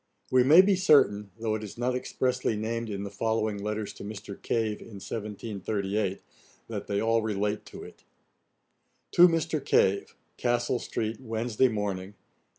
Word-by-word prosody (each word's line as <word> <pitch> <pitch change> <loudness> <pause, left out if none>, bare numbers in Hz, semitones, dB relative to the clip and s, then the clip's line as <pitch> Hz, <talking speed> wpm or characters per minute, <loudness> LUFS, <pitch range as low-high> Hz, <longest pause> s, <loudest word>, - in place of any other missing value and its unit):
] - - -35
We 130 -1 +5
may 155 +8 +8
be 195 +1 +3
certain, 105 - +4
though 110 -1 -1
it 110 0 -3
is 105 - -8
not 125 +1 0
expressly 125 -1 -1
named 115 +2 -3
in 100 -1 -4
the 100 - -6
following 110 0 -1
letters 105 0 -3
to - - -10
Mr. 105 -1 -7
Cave, 110 -2 -1
in 110 - -11
1738, 100 -1 -3 0.4
that 105 -3 -5
they 100 0 0
all 115 0 +2
relate 105 -1 -2
to - - -9
it: - - -13 1.1
'To 175 - +8
MR. 165 -3 -1
CAVE. 100 -5 +2 0.2
'Castle 120 0 0
street, 110 -1 -3
Wednesday 115 +1 +1
Morning. 100 -3 -3
110 Hz, 155 wpm, -28 LUFS, 105-120 Hz, 1.1 s, may